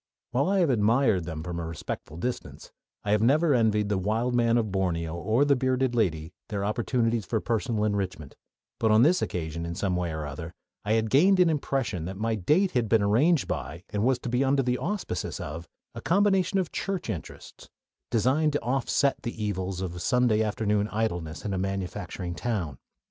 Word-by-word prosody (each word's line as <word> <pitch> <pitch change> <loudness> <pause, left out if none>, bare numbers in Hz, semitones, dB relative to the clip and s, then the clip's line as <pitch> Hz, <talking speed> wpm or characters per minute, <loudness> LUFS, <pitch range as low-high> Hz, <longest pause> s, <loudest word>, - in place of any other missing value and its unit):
While 140 +7 +1
I 195 -1 +3
have 165 -6 +3
admired 110 -4 +2
them 80 -2 -5
at 85 - -8
a - - -3
respectful 80 -1 -5
distance, 125 +8 -5 0.3
I 100 - -1
have 105 0 +3
never 145 +6 +4
envied 110 -4 +2
the 100 -2 0
wild 110 +6 0
man 120 -1 +3
of 110 -4 0
Borneo 85 -4 -1
or 110 +11 +1
the 140 -1 +4
bearded 130 0 +1
lady 85 -8 0 0.2
their 100 -2 -2
opportunities 115 +1 0
for 110 +3 -1
personal 115 0 -1
enrichment; 95 -8 -2 0.4
but 110 - +2
on 110 +2 +6
this 175 +6 +4
occasion 85 -1 -3
in 85 0 -4
some 95 -1 -1
way 90 -2 -1
or 80 -1 -4
other 75 +4 -7 0.3
I 105 - 0
had 110 -1 +1
gained 185 +7 +5
an 175 -2 +5
impression 130 - -1
that 95 +2 -6
my 115 +2 0
date 150 - +2
had 120 -5 0
been 110 -3 +4
arranged 135 +10 +3
by, 85 +3 -4
and 105 0 -1
was 130 +1 +3
to 125 - -4
be 125 +3 +1
under 135 0 +2
the 125 0 0
auspices 190 - -3
of, 80 +3 -6 0.3
a - - -7
combination 195 0 +2
of 185 -4 -1
church 195 -3 -3
interests, 80 - -8 0.4
designed 130 +7 +2
to 145 - 0
offset 135 +2 +1
the 120 -2 -5
evils 95 -2 -2
of 90 -2 -4
Sunday 125 0 +2
afternoon 105 -1 0
idleness 85 -8 -3
in 100 - -2
a 95 - -1
manufacturing 95 -2 -4
town. 85 - -3
110 Hz, 190 wpm, -27 LUFS, 90-130 Hz, 0.4 s, on